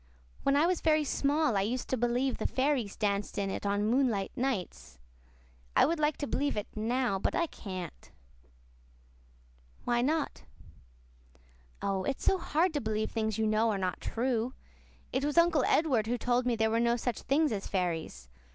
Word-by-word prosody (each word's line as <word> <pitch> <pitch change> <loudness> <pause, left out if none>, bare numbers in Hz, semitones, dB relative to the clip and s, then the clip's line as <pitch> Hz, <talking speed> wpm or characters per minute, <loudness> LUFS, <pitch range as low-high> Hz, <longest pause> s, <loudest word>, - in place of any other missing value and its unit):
When 275 - +2
I 295 +3 +4
was 360 0 +1
very 310 -1 +3
small 290 -2 +1
I 195 - +3
used 240 +6 -2
to - - +1
believe 245 +2 0
the - - 0
fairies 260 -6 0
danced 205 -1 -1
in 195 -1 -1
it 200 - -3
on 205 +1 +1
moonlight 230 -4 +1
nights. 245 - -3 0.8
I - - +6
would 335 +1 0
like 300 -1 +1
to 285 - -3
believe 285 -3 -1
it 210 - -1
now 230 -1 0
but - - -1
I 340 - +2
can't." 185 - -8 1.7
"Why 240 0 +1
not?" 300 +4 -1 1.4
"Oh, 195 -1 0
it's 270 - -3
so 380 - +3
hard 335 +1 +1
to 290 - -1
believe 220 0 -1
things 220 -2 -1
you 220 - +1
know 215 +1 +2
are 210 - 0
not 185 -3 -2
true. 245 +1 -1 0.6
It 265 - 0
was 295 +2 -1
Uncle 335 -5 +5
Edward 260 -9 +2
who 245 +2 0
told 245 +1 +1
me 240 - +2
there 220 0 +1
were 225 - +2
no 235 0 +3
such 240 -1 -3
things 300 +2 +2
as 200 -2 -3
fairies. 170 - -2
240 Hz, 180 wpm, -30 LUFS, 210-280 Hz, 1.7 s, I